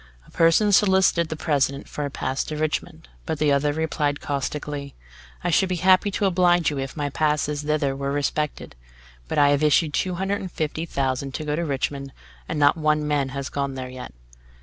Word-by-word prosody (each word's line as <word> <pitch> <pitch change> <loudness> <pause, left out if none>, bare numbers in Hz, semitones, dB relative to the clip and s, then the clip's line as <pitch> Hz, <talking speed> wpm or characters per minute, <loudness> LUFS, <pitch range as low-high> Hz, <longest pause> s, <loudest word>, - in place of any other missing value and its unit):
A - - -20
person 165 +6 +4
solicited 190 -4 +4
the 160 - -3
President 140 -3 0
for 145 - -4
a - - -3
pass 135 0 -2
to 155 - -5
Richmond. 155 +1 -3 0.2
But 160 - -1
the 150 -1 +2
other 140 +1 +2
replied 150 -2 -1
caustically: 145 0 -4 0.5
"I 175 - 0
should 190 +3 +3
be 185 - 0
happy 185 +3 +4
to 200 +1 -1
oblige 175 -3 +3
you 145 - -3
if 135 +3 -5
my 145 -1 -2
passes 150 0 0
thither 150 -2 0
were 140 0 -3
respected; 145 +1 -2 0.5
but - - -3
I 145 -1 +5
have 145 0 +2
issued 150 0 +3
two 180 +3 0
hundred 195 +3 -1
and 185 - -6
fifty 160 +1 -3
thousand 135 -1 -2
to 155 - -4
go 150 0 -1
to 170 - -1
Richmond, 140 -2 -3 0.4
and 165 - -2
not 145 +2 +4
one 155 -1 +1
man 145 -2 0
has 140 0 -5
got 140 -1 -3
there 130 -1 -5
yet!" 125 - -8
150 Hz, 200 wpm, -24 LUFS, 140-165 Hz, 0.5 s, I